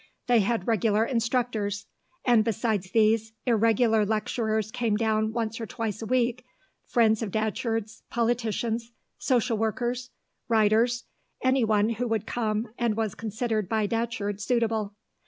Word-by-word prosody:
They 240 -2 +4
had 215 -1 0
regular 220 -1 +2
instructors; 230 -4 -1 0.4
and 240 -3 +5
besides 220 -4 -1
these, 220 +1 +2
irregular 225 -1 +3
lecturers 220 0 -1
came 230 -4 0
down 220 -1 +1
once 230 0 -3
or 225 - -4
twice 225 -3 -4
a 225 - -4
week, 250 0 +1 0.4
friends 220 -3 +3
of 220 - -2
Datcherd's, 220 +1 -2
politicians, 230 0 -1 0.3
social 245 -3 +1
workers, 245 +3 -1 0.4
writers, 225 +2 +3 0.4
anyone 225 -5 +3
who 235 +2 -2
would 225 -2 -1
come 220 -1 -2
and 230 -3 +1
was 220 -3 -1
considered 220 -2 -2
by 220 -1 +1
Datcherd 225 -2 -2
suitable. 225 -3 0
225 Hz, 130 wpm, -27 LUFS, 215-235 Hz, 0.4 s, and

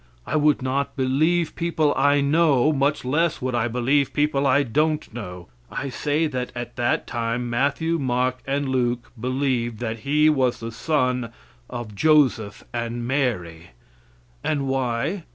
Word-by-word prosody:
I - - -3
would 150 -3 +3
not 135 +2 -1
believe 155 +6 +1
people 160 -3 +1
I 145 +1 +3
know, 150 -1 +3
much 140 0 0
less 160 +5 +1
would 130 0 -2
I 120 -1 +1
believe 125 +4 +1
people 145 -2 +1
I 140 +2 +4
don't 150 +2 0
know. 90 -7 -8 0.2
I 140 - -4
say 150 +4 0
that 130 -5 -3
at 120 0 -6
that 120 -1 0
time 120 0 -2
Matthew, 145 +7 0
Mark 130 -1 0
and 140 +1 0
Luke 125 -2 -1
believed 125 -2 -1
that 115 -1 -4
He 150 +6 +2
was 130 -5 +2
the 115 0 -5
son 125 -2 0 0.4
of 120 -3 -6
Joseph 125 -5 +2
and 120 0 -3
Mary. 90 - -2 0.7
And 145 -3 -1
why? 135 +7 -1
130 Hz, 150 wpm, -23 LUFS, 120-145 Hz, 0.7 s, I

